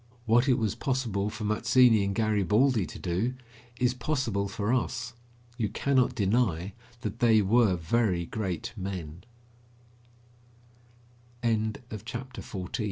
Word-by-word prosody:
What 120 +4 +4
it 125 - +4
was 110 -5 0
possible 115 -7 -1
for 105 - -7
Mazzini 115 +1 +4
and 100 0 -1
Garibaldi 110 +1 +2
to - - -9
do, 95 +8 -1 0.4
is 125 0 +2
possible 120 -6 -1
for 105 +2 -1
us. 125 -1 -2 0.5
You 110 -3 0
cannot 130 +3 +1
deny 100 -3 +1 0.3
that 110 +2 -5
they 110 -3 +5
were 105 -1 +4
very 90 +1 0
great 95 -1 -4
men. 90 -4 -6 2.2
CHAPTER 115 +2 -3
XV - - -12
ITALY 95 -1 -3
AND - - -2
110 Hz, 125 wpm, -28 LUFS, 100-120 Hz, 2.2 s, they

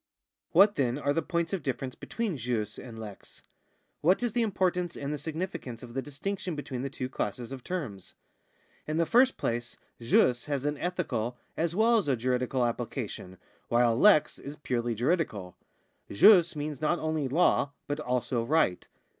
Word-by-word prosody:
What, 200 +4 +5
then, 125 -2 +1
are 145 -1 0
the 165 - +1
points 170 +1 -2
of 190 - -1
difference 130 -1 -3
between 225 - -3
jus 115 -4 -3
and 120 -3 -9
lex; 105 -3 -10 0.6
what 185 +9 +3
is 240 -3 0
the 240 - +1
importance 180 -5 0
and 140 +1 -3
the - - -2
significance 155 -6 -5
of 120 -1 -10
the 135 - -1
distinction 175 +5 -4
between 135 -4 -5
the 135 - -3
two 130 -1 -4
classes 120 0 -4
of 130 -2 -7
terms? 130 - -5 0.7
In 155 +1 -1
the 165 - +3
first 250 - +4
place 120 +1 -3 0.2
jus 120 +1 +3
has 145 -2 -2
an 145 0 -1
ethical 150 -10 -2 0.2
as 165 +1 -1
well 225 +2 +4
as 195 - -3
a 135 - +3
juridical 125 +1 0
application, 115 -5 -4 0.3
while 120 -1 +3
lex 195 - +5
is 140 +2 -8
purely 120 -5 -2
juridical. 115 - -1 0.5
Jvs 175 - +6
means 150 -2 -4
not 155 +3 +2
only 155 -3 -1
law 145 -1 +2
but 145 +1 -3
also 125 -3 -1
right. 125 - +1
140 Hz, 170 wpm, -29 LUFS, 120-170 Hz, 0.7 s, Jvs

